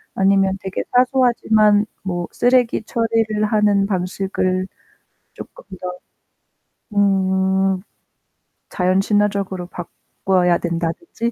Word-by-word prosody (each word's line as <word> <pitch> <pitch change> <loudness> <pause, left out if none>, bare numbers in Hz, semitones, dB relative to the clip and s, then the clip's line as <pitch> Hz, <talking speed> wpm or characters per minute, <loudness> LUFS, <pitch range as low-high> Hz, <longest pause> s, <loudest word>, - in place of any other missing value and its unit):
아니면 195 0 +2
되게 190 -1 -4
사소하지만 235 -5 +3 0.2
뭐 175 -2 -3
쓰레기 245 -2 +2
처리를 225 -2 0
하는 210 -2 +2
방식을 185 -1 -2 0.7
쪼끔 - - -12 0.2
더 180 0 -6 1.0
음. 190 -1 +1 0.9
자연 185 +1 +1
친화적으로 200 -3 0
바꿔야 180 0 -1
된다든지. 175 - -3
195 Hz, 210 characters per minute, -19 LUFS, 185-215 Hz, 1.0 s, 사소하지만